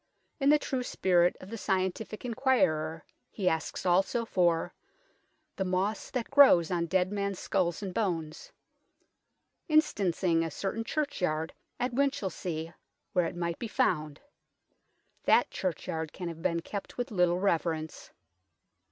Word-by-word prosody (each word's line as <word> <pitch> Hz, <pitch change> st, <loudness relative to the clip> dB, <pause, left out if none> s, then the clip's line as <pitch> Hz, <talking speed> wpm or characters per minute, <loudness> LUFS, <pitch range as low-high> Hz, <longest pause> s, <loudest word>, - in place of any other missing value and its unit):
In 275 Hz, 0 st, +3 dB
the 300 Hz, -, +7 dB
true 265 Hz, -3 st, -2 dB
spirit 180 Hz, -7 st, +2 dB
of 185 Hz, -, -11 dB
the 230 Hz, -, -5 dB
scientific 190 Hz, +4 st, -2 dB
enquirer 165 Hz, -, +1 dB, 0.2 s
he 195 Hz, -4 st, -3 dB
asks 160 Hz, +1 st, -1 dB
also 195 Hz, +6 st, +2 dB
for 175 Hz, -4 st, +1 dB, 0.4 s
" -, -, -44 dB
the 190 Hz, -, 0 dB
moss 190 Hz, +3 st, -1 dB
that 250 Hz, -3 st, -3 dB
grows 270 Hz, -, +7 dB
on 170 Hz, -1 st, 0 dB
dead 185 Hz, +1 st, +1 dB
men's 200 Hz, -2 st, -2 dB
sculls 180 Hz, 0 st, -1 dB
and 190 Hz, -2 st, -4 dB
bones," 165 Hz, -8 st, -2 dB, 1.2 s
instancing 190 Hz, -, +2 dB
a 165 Hz, -, -2 dB
certain 195 Hz, +8 st, -3 dB
churchyard 180 Hz, -, -1 dB, 0.3 s
at 245 Hz, 0 st, -1 dB
Winchilsea 190 Hz, -, -2 dB, 0.4 s
where 180 Hz, -3 st, +2 dB
it -, -, -6 dB
might 170 Hz, -1 st, -3 dB
be 235 Hz, -, -3 dB
found. 155 Hz, -8 st, 0 dB, 1.1 s
That -, -, +4 dB
churchyard 160 Hz, -3 st, -3 dB
can 180 Hz, -2 st, -5 dB
have 165 Hz, -1 st, -8 dB
been 170 Hz, 0 st, 0 dB
kept 200 Hz, +3 st, -7 dB
with 245 Hz, +1 st, -3 dB
little 180 Hz, -3 st, +2 dB
reverence. 165 Hz, -4 st, -1 dB
185 Hz, 135 wpm, -30 LUFS, 165-220 Hz, 1.2 s, the